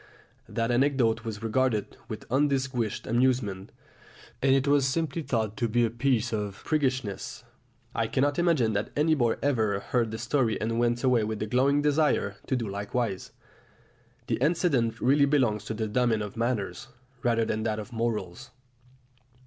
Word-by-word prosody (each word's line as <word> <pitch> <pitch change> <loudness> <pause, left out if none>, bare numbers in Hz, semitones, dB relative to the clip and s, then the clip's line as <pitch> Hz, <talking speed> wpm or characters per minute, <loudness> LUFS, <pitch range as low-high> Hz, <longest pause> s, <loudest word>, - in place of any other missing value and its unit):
That 115 +1 -1
anecdote 125 -2 +2
was 110 -1 -6
regarded 115 -1 0
with - - -6
undisguised 130 -5 0
amusement, 120 -5 0 0.7
and 135 +1 +3
it 135 +1 +3
was 140 -2 +4
simply 165 +4 -1
thought 110 -7 -1
to 115 - +1
be 120 +2 +2
a 115 - -2
piece 120 -1 0
of 105 -2 -4
priggishness. 130 -8 -1 0.5
I 115 - 0
cannot 140 +6 +1
imagine 155 -11 +2
that 105 +1 -1
any 155 +2 +3
boy 120 -6 +2
ever 110 -8 +1
heard 120 +1 0
the 110 - -5
story 120 -1 0
and 115 +2 -1
went 120 +1 +1
away 125 -4 +3
with 110 0 -3
a - - -1
glowing 135 +6 +2
desire 145 -9 +1
to 130 - +1
do 120 -3 -2
likewise. 100 +1 -3 1.0
The - - -1
incident 140 -5 +1
really 140 +2 +4
belongs 120 -8 +1
to 110 - -4
the 110 0 -2
domain 115 -1 +1
of 105 -1 -7
manners 115 -3 -2 0.3
rather 115 -3 +2
than 110 - -1
to - - -3
that 110 -1 0
of 110 +2 -7
morals. 115 0 -3
120 Hz, 165 wpm, -27 LUFS, 110-135 Hz, 1.0 s, was